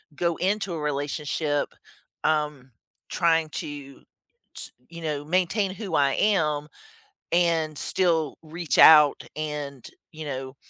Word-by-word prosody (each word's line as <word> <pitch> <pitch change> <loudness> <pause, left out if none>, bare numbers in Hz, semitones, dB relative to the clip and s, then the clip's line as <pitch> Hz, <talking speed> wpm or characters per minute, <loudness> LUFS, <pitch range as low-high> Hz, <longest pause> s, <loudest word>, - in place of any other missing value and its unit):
go 170 +2 -1
into 195 0 -1
a 165 - -4
relationship, 145 0 -2 0.6
um, 150 -4 -1 0.4
trying 165 -2 +2
to 145 -2 -7 0.5
t - - -9 0.2
you 170 0 -10
know, 150 -2 -3
maintain 185 +4 0
who 200 0 -5
I 140 -1 +3
am 150 -8 +1 0.7
and 165 -3 +1
still 165 -6 0
reach 165 +1 -3
out 150 -2 +8
and, 150 -4 -5 0.2
you 155 -1 -8
know, 135 -1 -6
155 Hz, 120 wpm, -25 LUFS, 145-170 Hz, 0.7 s, out